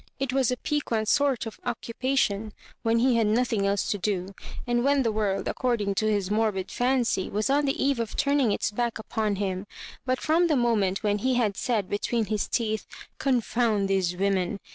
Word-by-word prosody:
It 270 -1 -1
was 265 -3 +2
a 250 - 0
piquant 245 -8 -1
sort 275 -3 +2
of 225 - -8
occupation 230 -3 -1 0.3
when 230 0 +2
he 245 0 +3
had 225 -2 +2
nothing 220 -2 +1
else 200 0 0
to 205 - -1
do, 190 -1 -2 0.3
and 240 0 +1
when 280 0 +3
the 230 - +1
world, 205 -2 -1
according 230 -6 0
to 215 0 +1
his 200 -2 -1
morbid 210 -3 0
fancy, 245 -6 +1
was 215 +6 0
on 290 +1 +3
the 275 - 0
eve 275 -3 +1
of 230 -2 -3
turning 280 -5 +2
its 205 - 0
back 235 +2 -1
upon 215 -1 -2
him 190 0 -3 0.2
— - - -16
but 255 0 +1
from 330 +3 +2
the 310 - +2
moment 215 -6 +1
when 205 -1 +1
he 255 +4 +1
had 220 -5 +1
said 215 -5 -1
between 220 +2 -1
his 210 -1 -1
teeth 220 -2 -1 0.2
*' - - -34
confound 235 -5 +1
these 190 -2 +1
women 195 +1 0
225 Hz, 200 wpm, -26 LUFS, 205-250 Hz, 0.3 s, he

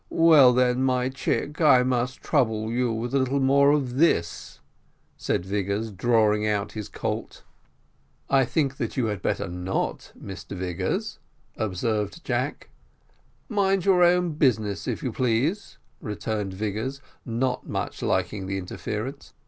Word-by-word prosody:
well 155 -6 +6
then, 125 0 +2
my 130 -1 +1
chick, 145 +3 -2
I 130 -5 +6
must 125 +1 -1
trouble 110 -6 +1
you 120 0 0
with 115 +3 -3
a 140 - +3
little 130 +2 +1
more 140 +1 +4
of 135 -4 0
this," 135 - +1 0.6
said 85 - -2
Vigors, 100 +3 -2
drawing 105 0 +2
out 105 -1 -1
his 105 -2 -6
colt. - - -5 0.8
"I 135 -1 +4
think 135 +1 -1
that - - -4
you 125 - +2
had 105 -4 -3
better - - -1
not, 90 +2 -3
Mr 95 0 -8
Vigors," 90 0 -3 0.4
observed 105 - -2
Jack. 130 +3 -2 0.8
"Mind 195 -5 +1
your 190 -2 +4
own 175 0 +3
business, 110 -9 0
if - - -3
you 130 - -1
please," 130 - -1 0.2
returned 105 -2 -3
Vigors, 110 +7 -3 0.2
not 125 +2 -2
much - - -4
liking 95 -3 -1
the 95 0 -2
interference. 110 +8 -6
120 Hz, 140 wpm, -25 LUFS, 105-135 Hz, 0.8 s, well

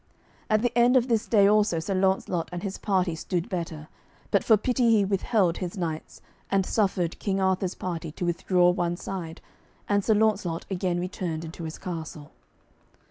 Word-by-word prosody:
At 215 +1 +2
the 245 -1 0
end 245 +2 +5
of 250 0 +1
this 230 -1 +1
day 205 -3 +5
also 210 -3 +3
Sir 165 +5 -2
Launcelot 190 -3 0
and 175 +1 -5
his 195 -2 -4
party 185 -4 +1
stood 170 +2 -3
better, 165 -4 -4 0.4
but - - +3
for 220 - +5
pity 245 +2 +1
he 215 -3 +4
withheld 195 -2 +1
his 180 0 -5
knights, 160 -3 -5 0.3
and 195 -1 +2
suffered 190 -6 0
King 195 -1 -1
Arthur's 190 -1 0
party 165 -3 -4
to 175 - -4
withdraw 175 +1 +3
one 175 -1 -1
side, 175 -4 -6 0.5
and 205 -1 +2
Sir 220 - +3
Launcelot 205 -6 +1
again 180 -2 -1
returned 175 -3 -4
into 165 +1 -7
his 160 - -6
castle. 160 -4 -7
185 Hz, 175 wpm, -26 LUFS, 170-205 Hz, 0.5 s, end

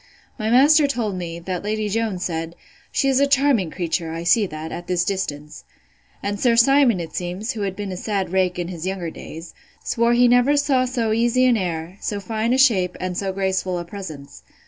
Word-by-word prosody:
My 215 0 -1
master 290 +5 +6
told 230 -7 -2
me, 170 -2 -5
that 180 +1 -4
Lady 215 +1 -1
Jones 210 -3 -2
said, 165 0 -4 0.4
She 275 - +1
is 265 -1 +3
a 280 - +4
charming 275 - +2
creature, 165 -1 -2
I 165 +1 -5
see 200 +4 +3
that, 155 -1 -7
at 175 0 -7
this 180 -1 +1
distance. 150 -7 -4 0.6
And 205 0 -2
Sir 240 0 +3
Simon, 245 -3 +4
it 165 -2 -7
seems, 180 +6 -3
who 225 - -6
has 195 -2 -2
been 205 -1 -5
a 185 - -5
sad 195 -2 -2
rake 185 -1 +1
in 175 -1 -3
his 175 -1 -5
younger 185 -4 -3
days, 165 +2 -10 0.3
swore 235 0 +1
he 245 +1 +5
never 245 +4 +4
saw 275 -3 +2
so 240 -3 -1
easy 240 +3 +2
an 250 -2 +4
air, 175 -1 -4
so 205 - -3
fine 220 +3 -2
a 255 - +3
shape, 200 -10 +3
and 185 -1 -3
so 195 +1 -2
graceful 190 -1 -1
a 175 - -5
presence. 165 -7 -9
195 Hz, 210 wpm, -22 LUFS, 175-235 Hz, 0.6 s, master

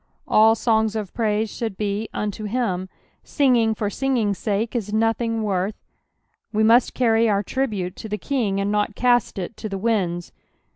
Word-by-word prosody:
All 220 +1 +5
songs 220 -1 +1
of 210 -4 -4
pnuse 220 -1 -1
should 220 -5 -4
be 210 +1 -2
" - - -39
vnto 210 0 -3
itfl*." 195 -6 -1 0.4
Singing 240 -6 +2
for 210 - -2
sioging's 220 -5 0
sake 220 +3 -1
is 210 -4 -2
nothing 225 +1 0
worth; 195 0 -1 0.8
we 215 0 +1
must 230 +3 +4
carry 230 -2 +3
our 200 -1 +1
tribute 205 -7 -2
to 220 - -7
the 210 - -2
King, 220 -7 -1
and 200 +1 0
not 210 0 0
cast 245 -3 +2
it 190 +4 -5
to 215 - -5
the 195 - -3
ninds. 190 -5 -1
220 Hz, 175 wpm, -22 LUFS, 200-230 Hz, 0.8 s, All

